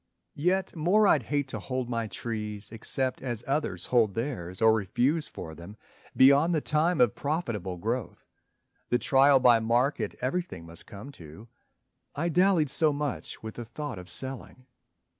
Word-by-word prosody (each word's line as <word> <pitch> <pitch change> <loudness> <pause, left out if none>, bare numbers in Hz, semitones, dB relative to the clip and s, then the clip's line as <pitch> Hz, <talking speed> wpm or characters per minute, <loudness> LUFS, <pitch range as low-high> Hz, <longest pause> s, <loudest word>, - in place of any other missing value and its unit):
Yet 180 +5 0
more 180 +7 +3
I'd 155 -8 +4
hate 145 +3 -2
to - - -5
hold 130 -2 -3
my 115 -2 -2
trees 105 0 -5
except 130 +3 -1
As 120 -3 -3
others 135 - -2
hold 110 -6 +2
theirs 115 -8 -4
or 110 0 +5
refuse 125 - 0
for 80 - -8
them, 85 +7 -11 0.4
Beyond 140 +6 +5
the - - +2
time 155 +3 +1
of 120 -4 +4
profitable 115 - -3
growth, 115 +6 -4 0.6
The 120 - +3
trial 135 +2 +4
by 120 -2 +5
market 120 +5 0
everything 130 - -3
must 85 0 -14
come 115 +6 -10
to. 85 +9 -12 0.7
I 165 +4 -1
dallied 175 -4 +3
so 155 +1 +3
much 145 -5 -5
with 110 -1 -6
the 120 - -7
thought 120 -1 -6
of 90 +1 -10
selling. 130 -1 -5
125 Hz, 160 wpm, -28 LUFS, 110-145 Hz, 0.7 s, or